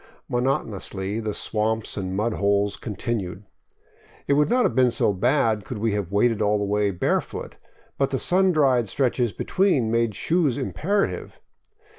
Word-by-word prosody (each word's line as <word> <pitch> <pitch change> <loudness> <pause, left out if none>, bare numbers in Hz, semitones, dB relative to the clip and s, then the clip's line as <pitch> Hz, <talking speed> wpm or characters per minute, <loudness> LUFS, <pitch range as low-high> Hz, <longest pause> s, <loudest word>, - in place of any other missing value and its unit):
Monotonously 110 -6 -2
the 110 -1 -3
swamps 110 +1 -1
and 95 -2 -4
mud 110 +2 0
holes 100 0 +1
continued. 105 -3 -4 0.8
It - - +2
would 150 +1 +3
not 250 0 +3
have - - +1
been 130 -1 +4
so 115 -3 +1
bad 115 0 +1
could 120 - -6
we 110 +1 0
have 100 -3 -3
waded 110 +2 +2
all 105 0 +2
the 105 - -2
way 105 0 +1
barefoot; 90 -3 -2 0.4
but 135 - +2
the 135 - -1
sun 185 +6 +3
dried 130 - +2
stretches 125 -1 0
between 165 - +1
made 115 -2 +1
shoes 160 - +1
imperative. 195 +9 -2
115 Hz, 155 wpm, -24 LUFS, 105-135 Hz, 0.8 s, been